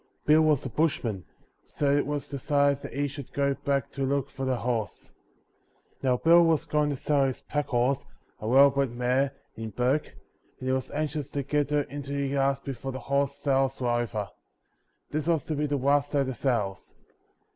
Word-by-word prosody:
Bill 155 +1 +6
was 155 -4 +2
a - - -2
bushman, 120 - -1 0.4
so 140 -1 0
it 145 - +1
was 145 -1 -3
decided 140 0 +1
that - - -8
he 145 +1 0
should 140 -1 -8
go 140 0 +1
back 140 0 -1
to 140 - -3
look 135 0 0
for 135 - -4
the 130 -1 +1
horse. 120 -3 -3 0.9
Now 130 -2 +2
Bill 170 +5 +6
was 165 -1 +2
going 150 -1 +1
to 145 - -1
sell 140 +1 +1
his 135 +1 -3
packhorse, 140 -2 0 0.4
a 110 - -5
well 135 +4 +7
bred 140 -1 0
mare, 125 +3 +1 0.2
in 110 0 -5
Bourke, 125 +7 0 0.5
and 130 - -5
he - - +2
was 130 -1 -1
anxious 150 -1 -3
to 140 -1 -3
get 145 +1 0
her 150 0 +2
into 140 0 -6
the 140 0 -1
yards 135 0 +1
before 135 -1 -5
the 130 - -5
horse 140 +1 0
sales 135 -2 0
were 125 -2 0
over; 120 -4 -1 0.8
this 155 +1 -2
was 165 -3 +2
to 155 - -3
be 150 +1 0
the 145 0 0
last 140 +2 +2
day 140 - +3
of - - +1
the 130 - -3
sales. 110 -8 -2
140 Hz, 200 wpm, -27 LUFS, 130-145 Hz, 0.9 s, well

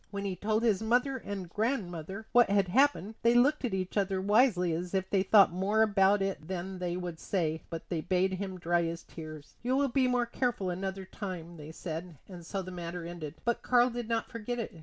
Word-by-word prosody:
When 200 -1 -4
he 190 -2 -2
told 215 +4 0
his 220 -4 +2
mother 245 +4 +2
and 200 -6 -6
grandmother 195 - -3
what 240 -3 +5
had 200 -2 +2
happened 235 - +3
they 235 +1 +4
looked 280 +5 +4
at 240 -6 -1
each 185 -1 -3
other 195 -1 +1
wisely 200 -3 +3
as 175 +3 -3
if 190 -1 0
they 195 - +3
thought 195 0 +6
more 200 +4 +2
about 200 -1 +3
it 190 -6 -3
than 185 +1 -4
they 175 -1 -2
would 175 -3 -5
say; 160 -4 -1
but 165 -1 -6
they 170 -3 -1
bade 185 +2 +1
him 190 0 -4
dry 175 0 +2
his 165 0 -3
tears. 155 -2 -10
"You 250 +2 0
will 280 0 +2
be 260 +1 +2
more 250 -1 +2
careful 235 -6 -1
another 190 +1 -4
time," 180 -4 -7
they 150 0 -9
said; 165 0 -6
and 180 -3 -10
so 190 +3 -4
the 185 - -8
matter 175 -1 -5
ended. 165 -3 -6
But 235 -1 +1
Karl 245 0 +4
did 235 -1 -5
not 230 -1 -1
forget 230 +1 -4
it. 230 - -4
190 Hz, 220 wpm, -30 LUFS, 175-225 Hz, -, thought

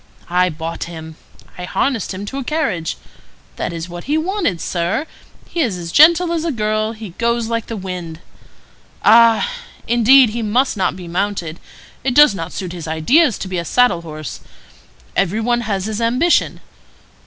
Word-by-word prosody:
I 180 +1 +3
bought 165 +1 -5
him. 160 -2 -9 0.4
I 180 - -4
harnessed 240 +2 -1
him 195 +1 -6
to 270 +7 -5
a - - -4
carriage. 230 - -2 0.6
That - - -3
is 165 0 -5
what 175 0 -9
he 295 +3 +1
wanted, 335 - -1
sir; 175 - -1 0.4
he 345 - -5
is 230 - 0
as 170 -1 -6
gentle 335 - +6
as 325 -2 -1
a 335 - -1
girl; 215 -2 -1
he 220 -2 -9
goes 235 -1 0
like 230 -1 -2
the 225 - -5
wind. 180 -4 -6 0.9
Ah! 230 - +6 0.4
indeed 240 +1 +5
he 235 +2 -3
must 235 +5 +1
not 185 -3 0
be 180 -2 -9
mounted. 175 -2 -3 0.4
It 250 -1 0
does 295 -5 +7
not 165 -2 -5
suit 180 -3 -5
his 170 -3 -7
ideas 230 - +3
to - - -6
be 185 -1 -2
a - - -3
saddle 245 -1 +2
horse. 155 -3 -7 0.8
Every 195 +3 +1
one 240 +1 +1
has 200 -4 -2
his 220 +1 -3
ambition. 250 +9 +2
215 Hz, 175 wpm, -18 LUFS, 175-245 Hz, 0.9 s, does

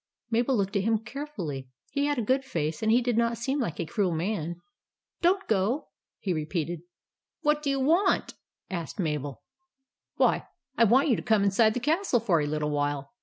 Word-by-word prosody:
Mabel 240 +3 +2
looked 195 0 -1
at 200 - +3
him 225 +2 +2
carefully. 215 - -6 0.2
He 280 +1 0
had 290 -1 0
a 240 - 0
good 260 +5 +2
face, 160 - -2
and 220 0 +2
did 240 -2 +2
not 235 0 +1
seem 270 +5 -1
like 225 - -2
a 170 - -1
cruel 190 +2 0
man. 170 -1 -2 0.3
" - - -57
Don't 380 +3 +2
go," 220 +7 0 0.3
he 190 - -1
repeated. 160 +1 -2 0.3
" - - -64
What 300 0 +2
do 290 - -1
you 275 0 +1
want? 335 +9 +2 0.2
" - - -53
asked 165 - -10
Mabel. 150 - -2 0.7
"Why, - - +2 0.3
I 230 - +5
want 260 +7 +4
you 240 - +4
to - - -3
come 220 -2 +3
inside 215 +2 +3
the - - 0
castle 305 +1 +2
for 190 -8 +2
a 145 - -1
little 150 0 -1
while. 145 +1 -1
220 Hz, 200 wpm, -28 LUFS, 165-265 Hz, 0.7 s, I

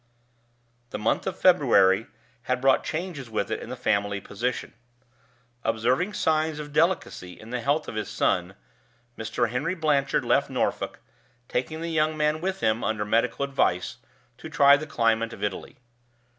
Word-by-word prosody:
The - - -4
month 110 - 0
of 190 - -3
February 115 - +4 0.4
had 130 -1 +2
brought 135 0 +3
changes 160 -6 -4
with 110 -3 -2
it - - -1
in - - -8
the 125 - -4
family 100 -4 0
position. 120 +5 -4 0.9
Observing 125 - +1
signs 155 -3 +1
of 150 -1 -7
delicacy 160 - 0
in 110 +2 -11
the 125 -1 -2
health 145 +6 0
of - - -5
his 110 -2 -3
son, - - 0 0.6
Mr. 110 +1 -1
Henry 165 +9 -1
Blanchard 145 -5 +1
left - - +2
Norfolk, - - -2 0.5
taking 155 +6 -3
the 165 0 -3
young 155 0 +1
man 150 +1 +1
with 190 +1 -2
him, 110 0 +1
under 110 -1 -1
medical 115 +5 +1
advice, 110 -10 0 0.4
to - - -8
try 140 0 +6
the 155 +2 -4
climate 115 -4 +1
of 100 - -8
Italy. 100 -2 -4
125 Hz, 155 wpm, -26 LUFS, 110-155 Hz, 0.9 s, try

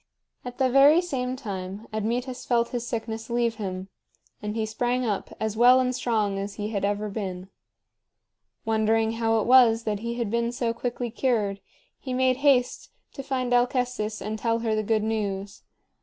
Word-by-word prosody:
At 245 0 -7
the 265 - +3
very 275 +5 +6
same 260 -8 -2
time 200 -4 -6
Admetus 245 +4 -2
felt 235 -1 +1
his 240 -1 -4
sickness 225 -1 -4
leave 235 -1 0
him, 190 -3 -5 0.5
and 210 0 -4
he 220 -1 0
sprang 245 +3 -1
up 210 -3 -2
as 220 -1 -2
well 245 +3 +6
and 255 0 +1
strong 210 -6 0
as 200 0 -5
he 210 0 -4
had 205 -3 -3
ever 205 +1 0
been. 190 -3 -5 1.2
Wondering 220 0 +2
how 225 0 +1
it - - -2
was 235 -2 +6
that 210 -2 -2
he 235 +2 -4
had 235 -4 -2
been 235 0 0
so 240 -1 -1
quickly 240 0 -4
cured, 215 -6 0 0.4
he 255 -2 -4
made 255 0 +2
haste 270 -3 +2 0.2
to 275 - -6
find 260 -2 -2
Alcestis 245 -3 0
and 215 0 -4
tell 230 +1 +1
her 220 - +1
the 215 - +1
good 215 0 0
news. 205 -2 -3
230 Hz, 175 wpm, -26 LUFS, 215-250 Hz, 1.2 s, very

